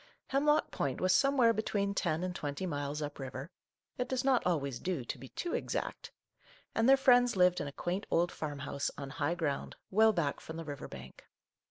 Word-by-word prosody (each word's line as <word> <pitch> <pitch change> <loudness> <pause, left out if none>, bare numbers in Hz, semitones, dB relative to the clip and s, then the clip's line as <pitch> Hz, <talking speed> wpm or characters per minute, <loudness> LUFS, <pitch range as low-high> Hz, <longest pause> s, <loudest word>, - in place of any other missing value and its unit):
Hemlock 295 +3 +2
Point 135 -2 -2
was 185 0 +3
somewhere 260 -1 +4
between 200 -2 -1
ten 160 -3 0
and 180 -1 -3
twenty 145 +4 -3
miles 145 -2 -3
up 145 0 -6
river, 135 +4 -6 0.2
— - - -49
it 250 0 -1
does 260 0 0
not 265 -2 +3
always 140 -7 0
do 175 -9 -2
to - - -4
be 135 - -9
too 345 - -4
exact, - - -3 0.3
— - - -28
and 225 +3 +3
their 270 - +8
friends 245 -3 +5
lived 180 -1 +4
in 145 - -3
a - - -5
quaint 180 +7 -3
old 175 +1 +2
farmhouse, 145 -2 -3
on 140 -1 -6
high 170 +4 -1
ground, 155 -5 -2 0.2
well 220 +3 +6
back 165 -8 -1
from 160 - -8
the 165 - -6
river 145 -2 -6
bank. - - -11
175 Hz, 205 wpm, -32 LUFS, 145-225 Hz, 0.3 s, their